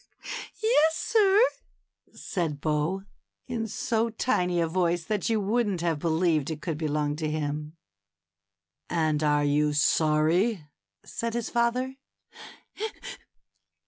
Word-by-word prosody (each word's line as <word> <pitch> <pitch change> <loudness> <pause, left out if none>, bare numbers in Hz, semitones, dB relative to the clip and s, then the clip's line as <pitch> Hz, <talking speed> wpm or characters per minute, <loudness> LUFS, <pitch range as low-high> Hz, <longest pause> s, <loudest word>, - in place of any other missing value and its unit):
^^Yes, 320 -9 +4
sir," 405 +2 +3 0.7
said 160 -6 -3
Bo, 155 +5 -1 0.4
in 235 -3 -3
so 230 +2 0
tiny 180 -6 0
a 170 - +3
voice 175 0 0
that 210 +4 -1
you 225 -1 +2
wouldn't 205 -3 0
have 165 -3 0
believed 160 -2 +1
it 155 -2 -4
could 160 -2 -4
belong 150 -2 0
to 155 -1 -2
him. 150 +1 -3 1.1
And 155 -3 +1
are 150 -1 +2
you 150 +1 +2
sorry? 155 +6 +2 0.2
" 100 0 -59
said 230 0 -4
his 235 -2 -3
father. 250 +3 0
170 Hz, 115 wpm, -27 LUFS, 150-225 Hz, 1.1 s, ^^Yes